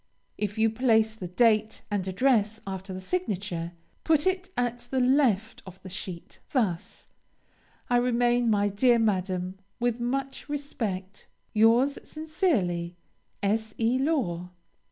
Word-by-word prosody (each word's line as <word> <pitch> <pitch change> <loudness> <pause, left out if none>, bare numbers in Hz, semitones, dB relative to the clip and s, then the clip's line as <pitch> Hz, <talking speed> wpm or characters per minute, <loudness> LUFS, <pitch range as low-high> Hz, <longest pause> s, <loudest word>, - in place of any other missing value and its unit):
If 210 0 -3
you 220 0 +3
place 220 -2 +3
the 195 -5 -7
date 215 +3 +2
and 195 -2 -1
address 220 +1 +2
after 190 0 -6
the 185 - -5
signature, 185 - -3 0.3
put 315 -2 +3
it 375 0 0
at 245 0 -1
the 265 - 0
left 250 -5 +2
of 190 0 -12
the 185 - -9
sheet; 180 -2 -7
thus 205 - -1 0.8
I 245 - +3
remain, 245 -1 +2
my 205 -1 +3
dear 235 +5 +4
Madam, 185 -3 -1 0.2
With 240 0 0
much 270 +4 -3
respect, 210 -10 -4 0.3
Yours 235 +6 +4
sincerely, 225 - -1 0.5
S. 220 +1 0
E. 235 +3 +2
LAW. 225 - 0
220 Hz, 130 wpm, -27 LUFS, 190-250 Hz, 0.8 s, dear